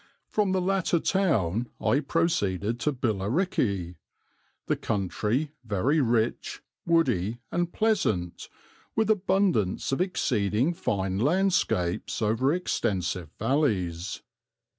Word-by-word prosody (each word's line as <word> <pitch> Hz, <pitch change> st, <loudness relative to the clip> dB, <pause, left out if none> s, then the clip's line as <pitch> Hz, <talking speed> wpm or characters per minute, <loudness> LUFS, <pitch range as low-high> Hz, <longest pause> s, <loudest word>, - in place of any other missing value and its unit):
"From 205 Hz, -3 st, 0 dB
the 190 Hz, 0 st, +1 dB
latter 185 Hz, -2 st, +1 dB
town 125 Hz, -, +1 dB
I 140 Hz, -, +2 dB
proceeded 120 Hz, -, 0 dB
to 150 Hz, -, +1 dB
Billericay; 105 Hz, -, -1 dB, 0.7 s
the -, -, +1 dB
country 105 Hz, -, -1 dB
very 115 Hz, +8 st, +1 dB
rich, 115 Hz, -2 st, 0 dB, 0.2 s
woody, 120 Hz, -, +2 dB
and 175 Hz, 0 st, -1 dB
pleasant, 145 Hz, -, 0 dB, 0.5 s
with 220 Hz, -1 st, +3 dB
abundance 190 Hz, -, +1 dB
of 135 Hz, -, 0 dB
exceeding 125 Hz, -, +1 dB
fine 95 Hz, -, -1 dB
landscapes 135 Hz, -, +1 dB
over 115 Hz, +5 st, +2 dB
extensive 90 Hz, -, -1 dB
valleys. 105 Hz, -, -1 dB
120 Hz, 95 wpm, -27 LUFS, -, 0.7 s, with